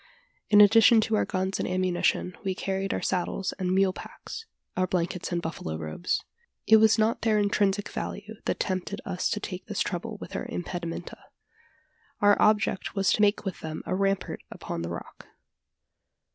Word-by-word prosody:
In 210 -1 +8
addition 225 +2 +7
to 220 0 0
our - - +2
guns 190 0 -2
and - - -1
ammunition, 185 0 0
we 190 -2 -1
carried 195 +1 -2
our - - -2
saddles 185 +1 -1
and 185 -1 0
mule 190 0 +3
packs, 455 - -9 0.3
our 185 0 +1
blankets 180 0 -2
and 175 -1 -1
buffalo 80 - -4
robes. 80 - -2 0.4
It 220 - +7
was 220 +1 +5
not 220 +1 +2
their 220 -2 +2
intrinsic 205 -1 +1
value 210 +2 -6
that - - -1
tempted 185 -2 -2
us 180 - -1
to 210 - -1
take 185 -2 -6
this 210 -2 -2
trouble 195 +4 -3
with - - -9
our - - -3
impedimenta: 175 -6 -5 1.0
our 205 0 +6
object 210 -2 +2
was 195 -1 +3
to - - +1
make 210 0 +3
with 190 - -4
them 155 -1 -6
a - - -2
rampart 195 0 0
upon - - -5
the 85 - -4
rock. 85 - -8
190 Hz, 170 wpm, -27 LUFS, 180-210 Hz, 1.0 s, In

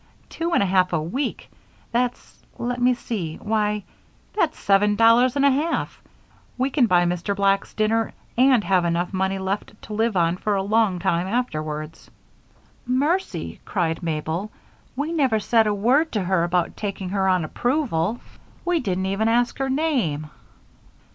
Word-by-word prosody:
Two 335 +1 -3
and 200 - +4
a - - +1
half 185 -1 +2
a 160 - +2
week! 225 - -3 0.4
That's 245 +1 -2 0.2
let 245 +1 -3
me 250 0 +4
see. 190 -10 -4
Why! 210 -1 -1 0.5
that's 340 -7 0
seven 205 +1 +3
dollars 230 +4 +5
and 280 0 +3
a 280 - +6
half! 305 +5 -1 0.6
We 260 +2 0
can 260 -4 +3
buy 175 -3 +4
Mr. 180 +3 -1
Black's 195 0 +1
dinner 225 +1 +1 0.2
and 255 -2 +4
have 185 -3 +2
enough 175 +2 -1
money 190 +1 0
left 195 +2 -4
to 215 - -8
live 220 -1 0
on 170 0 +2
for 210 +2 -1
a 195 - 0
long 210 -2 +2
time 175 0 0
afterwards." 155 -9 -3 0.8
"Mercy!" 295 +10 -1
cried 165 -4 -1
Mabel. 165 +4 -3 0.5
"We 290 +5 -2
never 265 -9 +2
said 225 +1 +3
a - - +2
word 260 +10 +2
to 210 -4 0
her 180 -1 +1
about 175 0 0
taking 195 -3 -4
her 190 0 0
on 185 -3 +2
approval. 240 - -1 0.4
We 350 -1 +2
didn't 190 -7 -2
even 195 +3 0
ask 240 +3 +1
her 270 0 0
name." 245 - 0
210 Hz, 160 wpm, -23 LUFS, 180-245 Hz, 0.8 s, a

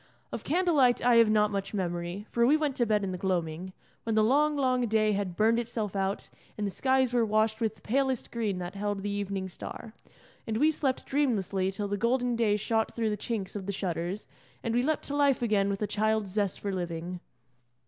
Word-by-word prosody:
Of - - -5
candle 350 +2 +1
light 250 -5 +4
I 245 -1 +6
have 230 -2 +6
not 210 -1 +3
much 200 +1 -3
memory, 175 +1 -3
for 235 - +2
we 295 +4 +5
went 300 -4 -1
to 240 - +2
bed 210 -1 +2
in 190 - -2
the 180 - -5
gloaming, 180 -1 -2 0.3
when 225 -1 -2
the 215 - +4
long, 295 +6 +3
long 255 -3 +1
day 215 -1 +2
had 195 -3 -2
burned 225 +3 +3
itself 225 -4 -3
out 195 0 -1 0.3
and 210 - -1
the 200 - -2
skies 260 +3 +2
were 240 -1 +3
washed 220 +1 +1
with 220 -2 -2
palest 265 +1 0
green 215 -5 -1
that 175 0 -5
held 205 -1 -3
the 205 - -2
evening 200 -1 -3
star; 215 +4 -8 0.5
and 220 -1 -1
we 305 +6 +4
slept 275 -4 -1
dreamlessly 200 -9 0
till 205 +1 -3
the 205 0 -2
golden 245 +2 +1
day 215 -3 +2
shot 220 +1 -1
through 225 -2 0
the - - 0
chinks 210 -2 -4
of 195 -2 -5
the - - 0
shutters, 180 0 -3 0.4
and 230 - -1
we 240 - +3
leapt 305 +3 0
to 285 - -3
life 280 -3 +3
again 205 -3 +2
with 200 +1 -2
a - - 0
child's 215 -1 0
zest 200 -1 -1
for 200 - -3
living. 175 0 -4
215 Hz, 220 wpm, -29 LUFS, 195-240 Hz, 0.5 s, I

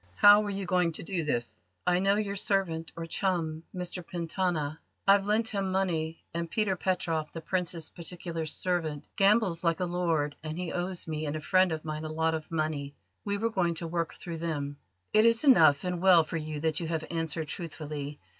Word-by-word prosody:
"How 205 - +8
were 210 - -3
you 195 -1 -3
going 180 -2 +2
to - - -5
do 180 -2 -2
this?" 120 -10 -2 0.2
"I 180 0 +3
know 195 +1 +3
your 205 -1 -1
servant 185 -5 0
or 165 0 -5
chum, 165 -3 -1
Mr 180 0 -5
Pentana. 165 -3 -2 0.3
I've 200 0 +5
lent 220 +2 +2
him 195 -2 -1
money: 165 -4 -1
and 170 0 -3
Peter 210 -1 +1
Petroff, 170 -4 -1
the 165 - -5
Prince's 170 -2 -2
particular 170 -1 -5
servant, 160 -3 -1
gambles 195 -4 +3
like 165 -1 +2
a 180 - +1
lord, 165 -4 0
and 155 +1 -5
he 180 -1 -3
owes 180 0 -2
me 155 -1 -3
and 145 - -2
a - - -2
friend 185 +3 +3
of 155 -1 -4
mine 155 0 -4
a - - -4
lot 160 +1 +1
of 160 -1 -4
money. 155 -3 -2 0.3
We 200 0 0
were 230 +2 0
going 175 -5 +1
to 170 - -3
work 165 0 -2
through 170 -2 -6
them." 145 -4 -3 0.4
"It 215 - +6
is 230 +2 +4
enough; 160 - +6
and 180 -1 -2
well 180 -3 +7
for 160 +2 -4
you 155 -1 -4
that 160 -1 +1
you 170 - -3
have 160 -1 -2
answered 165 -1 -2
truthfully. 150 -3 -5
170 Hz, 200 wpm, -29 LUFS, 155-185 Hz, 0.4 s, How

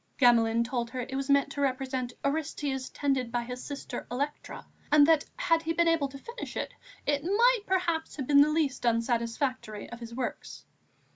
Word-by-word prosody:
Gamelin 230 -3 +4
told 235 0 -2
her 255 +1 -4
it 265 +2 -7
was 275 0 -3
meant 280 -1 +3
to 285 - -4
represent 260 -2 -1
Orestes 280 -3 -2
tended 265 -4 -1
by 240 0 -1
his 250 +1 -7
sister 280 -4 -6
Electra, 285 +4 -4 0.3
and 295 -1 +7
that, 320 -1 +4
had 330 -10 +2
he 330 0 -1
been 340 +1 +2
able 330 -4 +3
to 275 0 -10
finish 470 - -8
it, - - -3 0.3
it 285 -1 +1
might 460 +6 +4
perhaps 340 -4 0
have 275 - -4
been 285 +1 +6
the 295 - +5
least 305 -4 0
unsatisfactory 230 -1 -1
of 235 - -7
his 235 -1 -8
works. 255 -1 -5
275 Hz, 185 wpm, -29 LUFS, 245-305 Hz, 0.3 s, and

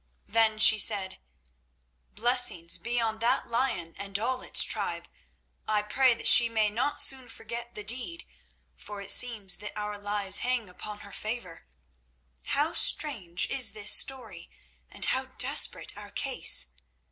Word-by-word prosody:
Then 220 0 0
she 215 0 +5
said: 195 -2 +1 1.0
"Blessings 220 -7 0
be 240 +1 -3
on 220 -1 -3
that 230 +1 -1
lion 230 -9 -3
and 200 -1 -4
all 255 +4 -3
its - - +5
tribe! - - -4 0.6
I 210 -1 -1
pray 255 +3 +1
that - - -2
she 235 -1 +8
may 220 -2 -1
not 245 +7 -3
soon 260 -2 +3
forget 235 +2 -9
the 210 - -7
deed, 250 +10 0 0.5
for 205 -1 -11
it 200 - -6
seems 215 -7 -1
that 210 +1 -10
our 210 0 -6
lives 205 -1 0
hang 245 -5 -3
upon 205 +3 -10
her 200 - -14
favour. 215 -7 -8 0.8
How 295 +3 -2
strange 190 - +2
is 255 -4 +3
this 210 0 +2
story, 230 -10 -3 0.4
and - - +4
how - - -1
desperate - - +3
our - - -10
case! 60 - +1
220 Hz, 145 wpm, -26 LUFS, 205-245 Hz, 1.0 s, she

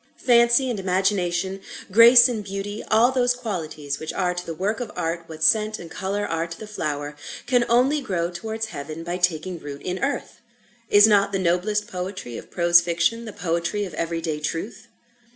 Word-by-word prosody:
Fancy 235 +1 +5
and 220 - -3
Imagination, 190 0 0 0.3
Grace 235 +4 +8
and 230 -4 -3
Beauty, 200 +1 -5
all 230 +4 +4
those 250 -1 +2
qualities 160 - -5
which 155 - -5
are 180 -2 0
to 180 0 -5
the 165 - -6
work 205 +6 -2
of 245 -3 -5
Art 165 +1 -3
what 160 -1 -7
scent 215 +2 +3
and 170 - -11
colour 200 +1 -3
are 165 -1 -2
to 165 0 -9
the 215 - -7
flower, 150 -7 -4 0.3
can 245 -1 +2
only 260 +5 +3
grow 175 -8 -2
towards 220 +5 -5
heaven 155 +3 -7
by 175 +1 -3
taking 175 0 -1
root 145 -2 -9
in 185 +1 -3
earth. 275 -3 -3 0.5
Is 205 0 +7
not 200 -2 +3
the 195 - 0
noblest 190 +4 0
poetry 180 - -6
of - - -9
prose 175 -1 +5
fiction 170 +7 0
the 220 - -7
poetry 170 +4 -2
of 180 - -9
every 165 +1 -3
day 155 -2 -3
truth? 200 +9 -5
190 Hz, 190 wpm, -23 LUFS, 170-220 Hz, 0.5 s, Grace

